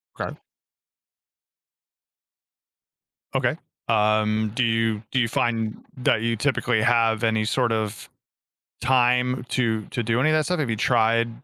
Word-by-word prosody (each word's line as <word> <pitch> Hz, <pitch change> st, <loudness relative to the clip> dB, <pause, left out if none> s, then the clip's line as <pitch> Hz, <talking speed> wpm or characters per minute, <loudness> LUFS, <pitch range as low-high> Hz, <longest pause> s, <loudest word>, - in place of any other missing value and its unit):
'Kay. -, -, -5 dB, 3.0 s
Okay, -, -, +1 dB, 0.3 s
um, 110 Hz, 0 st, +1 dB
do 125 Hz, -, +1 dB
you 115 Hz, -2 st, 0 dB
do 130 Hz, -, +1 dB
you 115 Hz, -, +2 dB
find 115 Hz, -1 st, -2 dB
that 125 Hz, -4 st, +1 dB
you 115 Hz, 0 st, 0 dB
typically 125 Hz, -2 st, 0 dB
have 115 Hz, -1 st, +2 dB
any 110 Hz, -1 st, +1 dB
sort 120 Hz, +2 st, 0 dB
of 110 Hz, -1 st, -3 dB, 0.7 s
time 125 Hz, 0 st, +2 dB
to 110 Hz, -4 st, 0 dB
to 120 Hz, -, -4 dB
do 115 Hz, +2 st, 0 dB
any 155 Hz, +4 st, +3 dB
of 155 Hz, -, +3 dB
that 155 Hz, -, +2 dB
stuff? 180 Hz, -1 st, -1 dB
Have 140 Hz, -6 st, -1 dB
you 110 Hz, -, 0 dB
tried 115 Hz, +2 st, +2 dB
115 Hz, 135 wpm, -23 LUFS, 110-125 Hz, 3.0 s, any